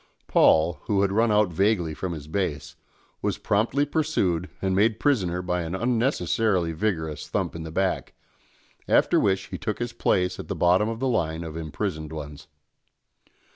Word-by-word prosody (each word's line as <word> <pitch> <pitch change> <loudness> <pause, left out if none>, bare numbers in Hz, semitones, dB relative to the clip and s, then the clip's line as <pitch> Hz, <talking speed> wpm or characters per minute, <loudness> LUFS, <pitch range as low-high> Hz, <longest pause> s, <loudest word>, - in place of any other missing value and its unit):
Paul, 80 +2 +4
who 100 -2 +2
had 100 - +1
run 110 +2 +2
out 105 -4 +3
vaguely 95 -3 +1
from 90 +3 -4
his 75 -3 -8
base, 80 -5 -3 0.5
was - - -1
promptly 115 +8 +1
pursued 100 - 0
and 95 -1 0
made 110 +3 +2
prisoner 90 - +1
by 90 0 -1
an 85 +2 -4
unnecessarily 115 - +1
vigorous 80 -3 -2
thump - - -2
in 85 - -5
the 80 0 -7
back, 95 +3 -1 0.7
after - - +4
which 95 -1 +1
he - - -6
took 110 -2 -3
his 120 0 -4
place 90 -5 0
at - - -7
the - - -3
bottom 90 +5 +3
of 115 0 -4
the 135 - 0
line 85 -9 -1
of 80 -2 -7
imprisoned 80 0 -4
ones. 75 -2 -8
95 Hz, 170 wpm, -25 LUFS, 80-110 Hz, 0.7 s, Paul